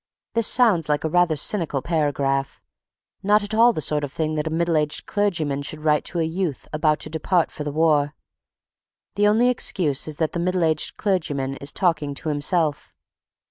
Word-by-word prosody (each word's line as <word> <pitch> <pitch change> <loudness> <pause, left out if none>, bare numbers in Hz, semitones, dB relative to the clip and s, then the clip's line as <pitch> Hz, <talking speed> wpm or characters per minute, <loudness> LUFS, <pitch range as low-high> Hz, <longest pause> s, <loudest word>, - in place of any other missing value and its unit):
This 230 -1 +2
sounds 205 - +3
like 150 -1 0
a 160 - -1
rather 175 -1 +2
cynical 150 -3 +1
paragraph, 140 -4 -1 0.6
not 205 +1 +3
at 205 +1 -5
all 230 +2 +5
the 155 - -4
sort 150 +1 -1
of 140 - -4
thing 155 +1 -2
that 155 0 -2
a - - 0
middle 170 +1 0
aged 150 -1 0
clergyman 165 -9 -1
should 150 +2 -6
write 150 -1 +2
to 175 - -3
a - - +2
youth 160 -3 -3
about 155 0 +1
to - - -4
depart 165 +2 0
for 150 - -6
the 145 - -4
war; 150 -1 +1 1.0
the 205 +1 +2
only 225 +4 +3
excuse 180 - +1
is 155 -2 -5
that 160 -2 -1
the 175 - -4
middle 180 0 0
aged 155 -2 0
clergyman 150 -9 -1
is 140 - -3
talking 160 -6 0
to 155 - -4
himself. 150 +1 0
160 Hz, 190 wpm, -22 LUFS, 150-180 Hz, 1.0 s, all